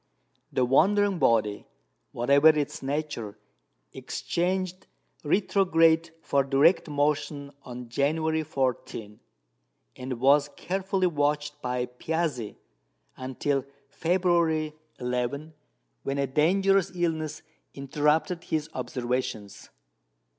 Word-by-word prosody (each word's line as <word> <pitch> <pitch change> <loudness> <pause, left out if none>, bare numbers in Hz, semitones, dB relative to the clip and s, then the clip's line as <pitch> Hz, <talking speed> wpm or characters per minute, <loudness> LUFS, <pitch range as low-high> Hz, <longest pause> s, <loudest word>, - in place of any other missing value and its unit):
The 130 - +2
wandering 195 +8 +3
body, 105 -6 +2 0.4
whatever 140 +5 +4
its 150 -2 0
nature, 135 -7 -3 0.6
exchanged 185 +1 -2 0.4
retrograde 165 -1 +3
for 140 -1 +2
direct 140 +7 +3
motion 145 -1 -1
on 125 -2 -8
January 160 +6 0
14, 125 -7 -3 0.8
and 125 -1 -5
was 140 +3 +4
carefully 190 +1 -1
watched 145 -2 0
by 125 0 -1
Piazzi 125 -2 -3 0.6
until 130 +1 -2 0.3
February 165 -2 +1 0.2
11, 125 +5 -2 0.5
when 135 0 -3
a 140 - +1
dangerous 190 +7 +2
illness 160 -3 -2 0.3
interrupted 150 +5 0
his 155 0 -2
observations. 125 -5 -4
150 Hz, 90 wpm, -27 LUFS, 130-165 Hz, 0.8 s, whatever